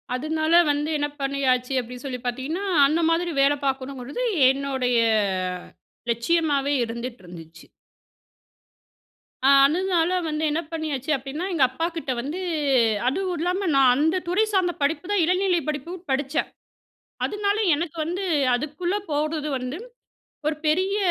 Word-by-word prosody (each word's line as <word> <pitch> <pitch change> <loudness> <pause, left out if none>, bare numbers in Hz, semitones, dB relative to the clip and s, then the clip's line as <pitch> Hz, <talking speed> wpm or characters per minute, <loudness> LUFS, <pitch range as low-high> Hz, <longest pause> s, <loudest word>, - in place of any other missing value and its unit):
அதுனால 315 +4 -1 0.2
வந்து 295 +1 -1
என்ன 290 0 0
பண்ணியாச்சு, 270 -2 0
அப்டின்னு 250 +2 -8
சொல்லி 255 -2 -4
பார்த்தீங்கன்னா? 265 +10 -3 0.2
அந்த 315 +3 +1
மாதிரி 340 +1 +1
வேல 280 +1 +4
பார்க்கணுங்கறது 270 - -3 0.3
என்னோடைய 265 -2 0 1.2
லட்சியமாவே 285 +2 +1
இருந்துட்டுருந்துச்சு. 180 -9 -9 1.8
ஆ - - +7 0.2
அதுனால 345 +2 +1 0.2
வந்து 305 +1 -2
என்ன 320 +3 0
பண்ணியாச்சு 310 -3 -3
அப்டின்னா, 275 +6 -5
எங்க 310 -6 +3
அப்பா 325 +6 -3
கிட்ட 310 -5 -3
வந்து 295 +8 -5 0.7
அதுவும் 365 +6 -1
இல்லாம 360 +3 -1
நான் 270 -2 +6
அந்த 320 +5 +2
துறை 370 +5 +2
சார்ந்த 365 -3 +2
படிப்புதான் 350 +7 0
இளநிலை 365 0 +2
படிப்பும் 330 +5 -5
படிச்சேன். 275 +2 -1 0.8
அதுனால 410 0 0 0.2
எனக்கு 335 +1 -4
வந்து 360 +4 -3 0.3
அதுக்குள்ள 305 +8 -2 0.2
போறது 305 +1 -1
வந்து 255 +4 -4 0.7
ஒரு 305 - 0
பெரிய 375 +6 +1
300 Hz, 120 wpm, -24 LUFS, 265-345 Hz, 1.8 s, ஆ